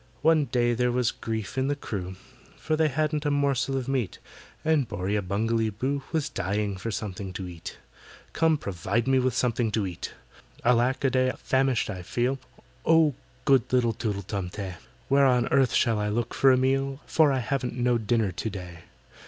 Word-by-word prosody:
One 155 Hz, -1 st, +4 dB
day 120 Hz, -2 st, +1 dB
there 125 Hz, +1 st, +1 dB
was 125 Hz, -1 st, +1 dB
grief 110 Hz, +2 st, -4 dB
in 130 Hz, -, +1 dB
the 145 Hz, -, 0 dB
crew, 95 Hz, -9 st, -5 dB, 0.4 s
For 155 Hz, -, -1 dB
they 160 Hz, 0 st, +3 dB
hadn't 150 Hz, +1 st, 0 dB
a 145 Hz, -, +1 dB
morsel 140 Hz, -2 st, +1 dB
of 130 Hz, -, -3 dB
meat, 130 Hz, -7 st, -1 dB, 0.5 s
And 155 Hz, -5 st, +3 dB
BORRIA 100 Hz, -1 st, -1 dB
BUNGALEE 110 Hz, +4 st, 0 dB
BOO 140 Hz, +4 st, -1 dB
Was 160 Hz, -3 st, 0 dB
dying 100 Hz, -3 st, -2 dB
for 95 Hz, +5 st, -5 dB
something 100 Hz, -3 st, -4 dB
to 95 Hz, 0 st, -5 dB
eat— 85 Hz, -2 st, -8 dB, 0.6 s
"Come, 160 Hz, -1 st, +3 dB
provide 100 Hz, -, -2 dB
me 135 Hz, 0 st, +4 dB
with 130 Hz, -2 st, 0 dB
something 120 Hz, -2 st, +1 dB
to 105 Hz, -2 st, +1 dB
eat! 90 Hz, -2 st, -5 dB, 0.5 s
"ALACK 125 Hz, +3 st, +3 dB
A 135 Hz, -, +4 dB
DEY, 130 Hz, 0 st, +2 dB
famished 130 Hz, -4 st, +1 dB
I 90 Hz, -3 st, -6 dB
feel; 125 Hz, +8 st, -1 dB, 0.4 s
Oh, 160 Hz, -2 st, +4 dB, 0.3 s
good 135 Hz, -4 st, +3 dB
little 120 Hz, -3 st, +3 dB
TOOTLE 105 Hz, -2 st, -3 dB
TUM 95 Hz, -1 st, -3 dB
TEH, 95 Hz, -2 st, -6 dB, 0.3 s
Where 140 Hz, 0 st, +5 dB
on 125 Hz, -2 st, +3 dB
earth 135 Hz, -2 st, +3 dB
shall 115 Hz, -4 st, +2 dB
I 105 Hz, 0 st, 0 dB
look 115 Hz, +3 st, -2 dB
for 135 Hz, -, +5 dB
a 130 Hz, -, +4 dB
meal? 135 Hz, +1 st, +1 dB
For 155 Hz, -3 st, +4 dB
I 135 Hz, -, +1 dB
haven't 125 Hz, 0 st, -2 dB
no 120 Hz, -1 st, +2 dB
dinner 110 Hz, -2 st, +1 dB
to 110 Hz, -, -3 dB
day! 90 Hz, -4 st, -8 dB
120 Hz, 185 wpm, -27 LUFS, 105-135 Hz, 0.6 s, Where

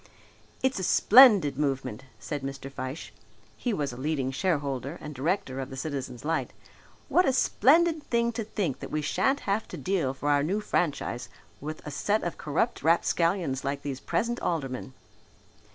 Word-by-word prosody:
"It's 265 Hz, -5 st, +1 dB
a -, -, -3 dB
splendid 205 Hz, -, +6 dB
movement!" 135 Hz, -4 st, -2 dB
said 145 Hz, -2 st, -5 dB
Mr. 135 Hz, 0 st, -6 dB
Fyshe 130 Hz, +3 st, -6 dB, 0.4 s
(he 245 Hz, -, -2 dB
was 145 Hz, -, -2 dB
a -, -, -9 dB
leading 135 Hz, -1 st, -1 dB
shareholder 140 Hz, -2 st, -1 dB
and 150 Hz, -, -7 dB
director 140 Hz, -1 st, -1 dB
of 135 Hz, -, -4 dB
the 135 Hz, -, -8 dB
Citizens' 135 Hz, -3 st, -5 dB
Light), 165 Hz, +1 st, -1 dB, 0.5 s
"what 360 Hz, -3 st, +3 dB
a -, -, +4 dB
splendid 310 Hz, +6 st, +3 dB
thing 235 Hz, 0 st, +2 dB
to 225 Hz, 0 st, -3 dB
think 205 Hz, -, -2 dB
that -, -, -7 dB
we 155 Hz, 0 st, -2 dB
shan't 270 Hz, -, +1 dB
have 200 Hz, +2 st, -1 dB
to -, -, -8 dB
deal 175 Hz, -9 st, -1 dB
for 145 Hz, +2 st, -2 dB
our 145 Hz, -1 st, +4 dB
new 185 Hz, +8 st, 0 dB
franchise 145 Hz, -, -1 dB, 0.3 s
with 155 Hz, +2 st, -7 dB
a 150 Hz, -, -5 dB
set 205 Hz, +9 st, 0 dB
of 175 Hz, -, -4 dB
corrupt 160 Hz, +11 st, -1 dB
rapscallions 165 Hz, -3 st, +1 dB
like 140 Hz, +1 st, -3 dB
these 135 Hz, -2 st, -4 dB
present 235 Hz, -, -1 dB
aldermen. 135 Hz, -5 st, -3 dB
150 Hz, 170 wpm, -28 LUFS, 135-205 Hz, 0.5 s, splendid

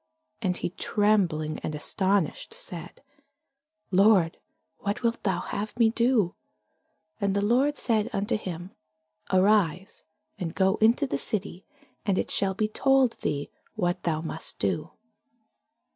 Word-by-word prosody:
And 180 Hz, -4 st, 0 dB
he -, -, -3 dB
trembling 180 Hz, -7 st, +1 dB
and 155 Hz, -, -4 dB
astonished 190 Hz, -, 0 dB
said, -, -, -6 dB, 0.9 s
Lord, 190 Hz, -3 st, +4 dB, 0.4 s
what 200 Hz, +4 st, -3 dB
wilt 235 Hz, 0 st, 0 dB
thou 190 Hz, -3 st, 0 dB
have 210 Hz, +3 st, -5 dB
me 230 Hz, -2 st, +4 dB
to 230 Hz, +1 st, 0 dB
do? 225 Hz, -8 st, +2 dB, 0.8 s
And 200 Hz, -2 st, 0 dB
the 200 Hz, -, +2 dB
Lord 265 Hz, +7 st, +2 dB
said 225 Hz, -2 st, +1 dB
unto 205 Hz, 0 st, 0 dB
him, 180 Hz, -3 st, -6 dB, 0.6 s
Arise, 190 Hz, -2 st, +2 dB, 0.4 s
and 170 Hz, -3 st, -4 dB
go 190 Hz, +1 st, +2 dB
into 230 Hz, +6 st, +4 dB
the 270 Hz, -, -2 dB
city, 195 Hz, -3 st, -4 dB, 0.4 s
and 195 Hz, -3 st, +1 dB
it -, -, -1 dB
shall 190 Hz, -1 st, +1 dB
be 215 Hz, +2 st, +1 dB
told 270 Hz, +2 st, +3 dB
thee 145 Hz, -1 st, -3 dB, 0.2 s
what 175 Hz, 0 st, -1 dB
thou 160 Hz, -2 st, -1 dB
must 160 Hz, 0 st, -2 dB
do. 150 Hz, +11 st, -1 dB
200 Hz, 135 wpm, -27 LUFS, 175-220 Hz, 0.9 s, Lord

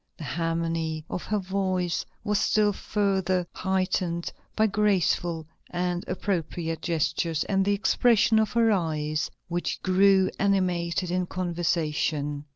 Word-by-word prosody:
The -, -, -8 dB
harmony 165 Hz, +1 st, -2 dB
of 180 Hz, -, -4 dB
her 210 Hz, -, 0 dB
voice 185 Hz, -2 st, -1 dB, 0.2 s
was 210 Hz, -2 st, +1 dB
still 210 Hz, -1 st, +3 dB
further 190 Hz, -3 st, 0 dB
heightened 185 Hz, -2 st, -1 dB, 0.2 s
by 220 Hz, -, +3 dB
graceful 185 Hz, -5 st, +1 dB, 0.2 s
and 180 Hz, 0 st, -1 dB
appropriate 165 Hz, -4 st, -2 dB
gestures 165 Hz, -1 st, 0 dB
and 195 Hz, -1 st, +1 dB
the 205 Hz, +1 st, +2 dB
expression 220 Hz, +1 st, +3 dB
of 220 Hz, -, 0 dB
her 230 Hz, -1 st, +4 dB
eyes, 155 Hz, -5 st, -1 dB, 0.2 s
which 175 Hz, +1 st, -2 dB
grew 190 Hz, 0 st, +4 dB
animated 180 Hz, -2 st, +1 dB
in 180 Hz, 0 st, 0 dB
conversation. 160 Hz, -5 st, -1 dB
180 Hz, 120 wpm, -26 LUFS, 165-195 Hz, 0.2 s, her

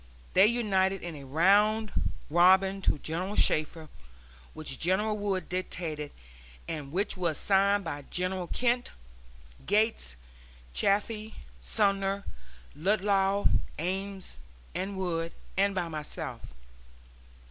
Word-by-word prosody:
They 190 Hz, +3 st, +7 dB
united 195 Hz, -5 st, +1 dB
in 170 Hz, -2 st, -5 dB
a 140 Hz, -2 st, -9 dB
round 205 Hz, +9 st, +3 dB, 0.4 s
robin 190 Hz, +4 st, +5 dB
to 170 Hz, -, +2 dB
General 180 Hz, +7 st, -3 dB
Shafter, 155 Hz, -2 st, +2 dB, 0.7 s
which 150 Hz, -4 st, -4 dB
General 210 Hz, +5 st, +1 dB
Wood 200 Hz, -4 st, -2 dB
dictated, 165 Hz, -5 st, -3 dB, 0.6 s
and 150 Hz, -4 st, -5 dB
which 200 Hz, +5 st, -1 dB
was 170 Hz, -4 st, -1 dB
signed 200 Hz, +1 st, +3 dB
by 145 Hz, -4 st, -5 dB
Generals 185 Hz, -1 st, -2 dB
Kent, 245 Hz, 0 st, 0 dB, 0.7 s
Gates, 210 Hz, -, +1 dB, 0.6 s
Chaffee, 210 Hz, -, 0 dB, 0.3 s
Sumner, 195 Hz, -, +1 dB, 0.5 s
Ludlow, 195 Hz, +2 st, +2 dB, 0.3 s
Ames, 190 Hz, -, -4 dB, 0.4 s
and 195 Hz, +1 st, -3 dB
Wood, 170 Hz, -3 st, -2 dB, 0.2 s
and 200 Hz, 0 st, +2 dB
by 180 Hz, -2 st, -1 dB
myself. 155 Hz, -2 st, -5 dB
190 Hz, 105 wpm, -29 LUFS, 165-200 Hz, 0.7 s, They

